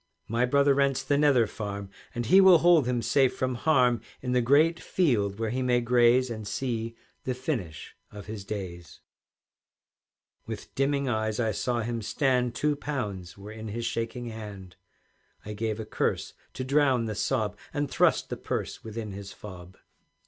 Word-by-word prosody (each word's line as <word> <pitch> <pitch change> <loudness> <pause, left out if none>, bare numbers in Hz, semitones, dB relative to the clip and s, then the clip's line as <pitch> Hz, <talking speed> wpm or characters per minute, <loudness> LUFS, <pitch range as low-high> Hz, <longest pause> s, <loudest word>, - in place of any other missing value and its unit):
"My 120 +3 +1
brother 140 +2 +4
rents 140 -1 +1
the 145 - +1
Nether 140 -5 +4
Farm, 100 -2 -6 0.2
And 120 0 -2
he 190 - +7
will 190 -2 +8
hold 165 -5 +5
him 120 -2 0
safe 130 +3 +2
from 130 0 0
harm 125 -4 +3 0.2
In 125 - -2
the 125 0 +3
great 155 +7 +4
field 105 - +1
where 110 -1 -2
he 130 +2 -1
may 125 -1 +2
graze, 120 +1 +3
And 110 -2 -6
see 115 -2 -3 0.3
the 130 - -2
finish 120 - -4
of 105 -1 -10
his 105 -1 -7
days." 90 -5 -7 1.5
With - - -7
dimming 140 0 0
eyes 110 -2 -1
I 110 -2 +1
saw 120 +3 -1
him 115 0 -3
stand, 125 +1 +1
Two 150 0 +1
pounds 105 -13 -5
were 100 +2 -9
in 110 0 -7
his 115 +2 -4
shaking 115 +2 -3
hand; 105 -5 -9 0.7
I 105 - -5
gave 110 +1 -2
a 110 - -4
curse - - -1 0.2
to 130 - -4
drown 135 -3 +2
the 110 - -3
sob, 105 0 -1 0.2
And 145 -1 -1
thrust - - +2
the - - -3
purse - - -4
within 110 -1 -6
his 100 0 -8
fob. 90 -3 -11
120 Hz, 170 wpm, -27 LUFS, 105-135 Hz, 1.5 s, will